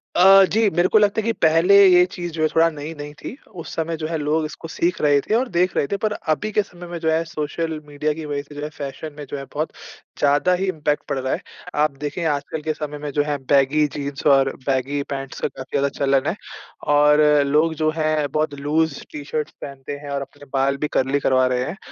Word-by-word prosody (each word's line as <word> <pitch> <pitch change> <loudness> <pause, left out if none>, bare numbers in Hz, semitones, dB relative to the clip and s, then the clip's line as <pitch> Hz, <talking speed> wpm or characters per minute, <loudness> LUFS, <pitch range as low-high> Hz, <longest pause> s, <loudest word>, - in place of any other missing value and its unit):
अ, 195 +2 +8
जी 220 -1 +3
मेरे 175 0 +2
को - - +8
लगता 210 +1 +3
है - - -8
कि 230 - +2
पहले 165 +5 +5
ये 180 -1 +7
चीज़ 175 -1 -5
जो 160 - -4
है 155 - +4
थोड़ा 165 +1 +5
नई-नई 150 -1 -7
थी - - -6 0.3
उस - - -9
समय 165 0 -2
जो 155 0 -3
है 165 0 -2
लोग 155 +1 0
इसको 155 +1 -8
सीख 170 +2 -1
रहे 145 -1 +4
थे 210 - -3
और 250 +2 +1
देख 180 0 +1
रहे - - +2
थे। 200 - -2
पर 215 0 -1 0.2
अभी 215 +7 -4
के 210 - +3
समय 175 -2 -12
में 175 0 -5
जो 160 0 0
है 160 +1 +2
सोशल 160 0 -3
मीडिया 150 +1 -2
की 160 0 -7
वजह 145 -1 -3
से 145 +1 -15
जो 145 - -6
है 150 - -3
फैशन 150 0 -7
में 150 - -6
जो 145 - -4
है 135 - -6
बहुत 155 +2 -2 0.5
ज़्यादा 145 +5 +3
ही 185 +2 0
इम्पैक्ट 150 -4 -1
पड़ - - -1
रहा 130 0 -1
है। - - -3 0.4
आप 155 - +2
देखे 150 +5 -4
आजकल 150 +2 -4
के 155 +1 -1
समय 150 -1 -6
में 145 0 -5
जो 145 +1 +1
है 145 -1 -2
बैगी 140 +2 +4
जीन्स 140 -2 -5
और 135 -1 +5 0.2
बैगी 135 +1 0
पैंट्स 135 -1 -5
का - - +1
काफ़ी 130 -1 -10
ज़्यादा 140 0 +1
चलन 135 -1 +2
है। - - -2 0.6
और 150 +1 +5 0.3
लोग 155 +3 +2
जो 155 - +3
हैं 155 -2 +1
बहुत 155 0 0
लूज़ 155 +1 0
टी-शर्ट्स 150 +1 -4
पहनते 140 0 -7
हैं 145 - -7
और 140 0 -2
अपने 140 +1 -11
बाल 135 0 +1
भी 150 - -1
कर्ली 135 +2 +1
करवा 130 -2 +3
रहे 125 0 0
हैं। 160 +8 -5
150 Hz, 240 wpm, -22 LUFS, 140-165 Hz, 0.6 s, अ